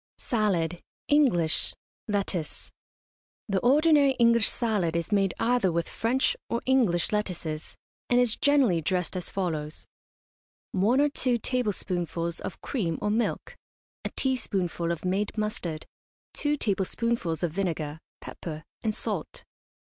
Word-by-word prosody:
SALAD, 180 -7 0 0.3
ENGLISH, 240 - +3 0.3
LETTUCE. 195 -6 -2 0.8
The 195 -3 +1
ordinary 285 - +5
English 235 -3 +4
salad 205 -9 0
is 170 +5 -2
made 195 -3 +2
either 235 -6 +2
with 170 0 -1
French 250 +4 +1
or 235 - 0
English 235 -10 +2
lettuces, 175 -7 -3 0.3
and 245 - +4
is 245 -3 +3
generally 270 - +3
dressed 180 +3 0
as 180 - -3
follows: 155 -5 -3 0.9
One 220 +8 +3
or 295 - +4
two 255 -3 +1
tablespoonfuls 180 -8 -1
of - - -7
cream 175 - -1
or 210 - 0
milk, 225 +2 -1 0.5
a - - -2
teaspoonful 190 -10 0
of 170 +1 -4
made 200 +4 -1
mustard, 210 -7 -2 0.5
two 295 0 0
tablespoonfuls 195 - -1
of 170 - +1
vinegar, 160 -4 -2 0.2
pepper, 155 -2 -7 0.2
and 220 -3 -1
salt. - - -3
200 Hz, 125 wpm, -27 LUFS, 170-240 Hz, 0.9 s, ordinary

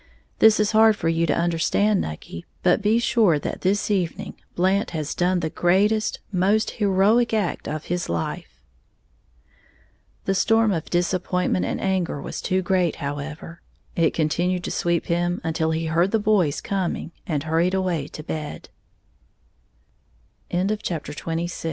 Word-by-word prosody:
This 220 -1 +6
is 210 -1 +2
hard 220 0 +5
for 165 - -1
you 165 0 +1
to - - +1
understand, 175 +5 +1
Nucky; 80 +2 -7 0.2
but 180 +4 +3
be 210 +3 +3
sure 225 -8 +3
that 145 - -5
this 205 +3 +1
evening 195 +1 -2 0.2
Blant 190 +4 +1
has 155 -1 -3
done 180 0 +1
the 160 -1 -2
greatest, 210 +5 +2
most 205 +4 +2
heroic 210 +4 +2
act 200 -6 -2
of 155 0 -4
his 175 0 -2
life." 85 -1 -4 1.6
The 195 - +1
storm 225 +3 +3
of 165 -5 -3
disappointment 180 +1 0
and - - -2
anger 185 -6 -1
was - - -6
too 185 -1 0
great, 180 -2 +1
however; 150 +4 -6 0.3
it 165 -1 +2
continued 175 +3 0
to - - -4
sweep 170 -1 0
him 175 +1 0
until 160 0 0
he 160 +1 -1
heard 165 +4 +2
the 225 - +2
boys 205 -8 +1
co 195 -3 -1
180 Hz, 125 wpm, -23 LUFS, 165-205 Hz, 1.6 s, This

